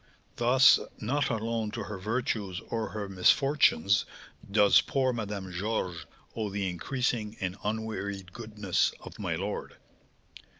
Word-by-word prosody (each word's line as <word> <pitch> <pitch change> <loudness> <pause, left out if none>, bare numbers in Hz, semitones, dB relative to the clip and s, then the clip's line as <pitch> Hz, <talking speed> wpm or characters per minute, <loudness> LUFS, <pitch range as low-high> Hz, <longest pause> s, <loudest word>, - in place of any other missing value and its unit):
Thus, 130 +2 +6 0.2
not 135 +6 0
alone 115 -1 -1
to - - -3
her 105 -2 -6
virtues 105 -3 -2
or 115 -1 -1
her 105 -2 -4
misfortunes 100 - +3 0.5
does 105 0 +6
poor 130 -2 0
Madame 105 -4 -4
Georges 90 -2 -3 0.3
owe 110 -2 -2
the 100 -1 -2
increasing 110 +4 -2
and 90 -1 -2
unwearied 100 -4 -3
goodness 105 -5 0
of - - -11
my 90 -5 -1
lord." 100 +5 -4
105 Hz, 125 wpm, -29 LUFS, 95-115 Hz, 0.5 s, Thus